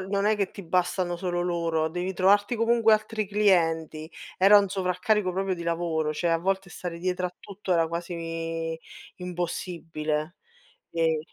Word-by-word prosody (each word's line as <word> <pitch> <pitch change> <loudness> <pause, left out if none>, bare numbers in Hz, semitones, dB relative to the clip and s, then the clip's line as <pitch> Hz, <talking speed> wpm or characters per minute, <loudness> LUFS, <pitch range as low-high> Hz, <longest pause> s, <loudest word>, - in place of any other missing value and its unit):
non 200 +2 -1
è 215 - +3
che 200 -2 -1
ti 200 - -9
bastano 180 0 0
solo 175 -1 -2
loro, 165 -2 0
devi 180 +3 -3
trovarti 205 +5 +3
comunque 230 -1 +4
altri 215 0 +1
clienti. 165 -6 +1 0.3
Era 200 +2 +7
un 200 - +1
sovraccarico 185 +1 0
proprio 190 +1 -1
di 170 - -7
lavoro, 165 -2 -1
cioè, 170 +3 -1
a 165 - +4
volte 190 +2 -1
stare 175 -1 -6
dietro 180 +1 -1
a 180 0 -3
tutto 200 -2 -4
era 165 -2 +3
quasi 165 -1 -4 0.4
impossibile 170 -3 -3 0.5
e 160 -1 +1
180 Hz, 155 wpm, -27 LUFS, 165-195 Hz, 0.5 s, Era